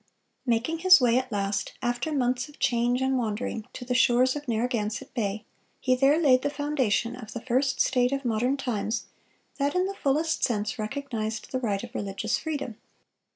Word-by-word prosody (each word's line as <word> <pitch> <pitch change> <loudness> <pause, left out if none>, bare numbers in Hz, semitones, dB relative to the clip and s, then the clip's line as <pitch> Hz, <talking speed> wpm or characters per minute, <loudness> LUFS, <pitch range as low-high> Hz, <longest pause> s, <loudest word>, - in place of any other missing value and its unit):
Making 245 +8 +1
his 370 0 +8
way 245 -1 +4
at 255 -1 -6
last, 200 -1 -1
after 245 +4 -1
months 255 -1 0
of 295 - -16
change 245 -1 +1
and 265 -1 +1
wandering, 220 -1 -3
to 245 - -7
the 250 - -1
shores 255 +1 +4
of 295 -1 -6
Narragansett 230 +1 -2
Bay, 215 -3 -2 0.3
he 255 - +2
there 275 +4 +4
laid 260 -6 +5
the 285 - 0
foundation 275 -6 0
of 235 -4 -9
the 235 - -5
first 260 +1 0
state 250 -1 +3
of 275 -1 -2
modern 240 +4 +1
times 230 -3 -2 0.5
that 285 +3 0
in 365 +1 +2
the 395 - -3
fullest 315 -1 0
sense 220 0 0
recognized 220 -2 -4
the 260 - -1
right 210 -5 -1
of 240 0 -9
religious 205 0 -2
freedom. 285 -8 -4
250 Hz, 180 wpm, -27 LUFS, 225-275 Hz, 0.5 s, his